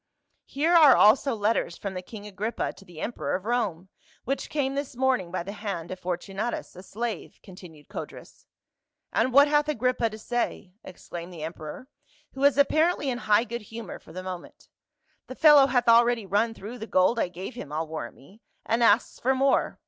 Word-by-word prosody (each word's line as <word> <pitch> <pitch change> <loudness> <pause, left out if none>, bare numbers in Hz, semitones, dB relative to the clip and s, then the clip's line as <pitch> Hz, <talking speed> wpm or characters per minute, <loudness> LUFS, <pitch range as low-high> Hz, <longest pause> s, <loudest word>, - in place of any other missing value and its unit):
" - - -47
Here 310 +5 0
are 310 -6 +8
also 245 +4 +5
letters 210 -5 0
from 200 -2 -5
the 185 - -5
king 205 +2 -11
Agrippa 210 +3 -3
to 195 - -16
the 175 -4 -13
emperor 235 - -3
of 185 +2 -5
Rome, 205 -7 -1 0.4
which 275 +3 -3
came 275 -3 -1
this 280 -2 -4
morning 255 -8 +1
by 180 0 -3
the 195 - -6
hand 195 -6 -5
of 185 - -6
Fortunatus, 195 +6 -4
a 185 - -10
slave," 220 +1 -5
continued 175 -5 -14
Codrus. - - -10 0.7
"And 255 - +2
what 280 +3 +7
hath 295 0 +2
Agrippa 250 -4 0
to 215 - -9
say?" 220 -5 -3
exclaimed 175 -1 -9
the 165 -3 -8
emperor, 160 +8 -7 0.5
who 270 - -8
was 280 -1 +4
apparently 310 0 +2
in 240 - -4
high 210 0 +3
good 235 0 -6
humor 225 -1 -8
for - - -16
the 185 +3 -7
moment. 185 -2 -9 0.3
" 315 0 -44
The 255 - -8
fellow 295 -3 +7
hath 245 -2 +1
already 235 -1 +5
run 215 +4 0
through 225 +5 -9
the 220 - -6
gold 185 +5 +3
I - - +1
gave 180 +7 -8
him 155 - -9
I'll 155 +2 -2
warrant 155 -7 -6
me, 195 +12 -19 0.2
and 230 +2 0
asks 230 - +3
for 265 +2 +1
more. 270 +1 +1
225 Hz, 195 wpm, -26 LUFS, 185-260 Hz, 0.7 s, are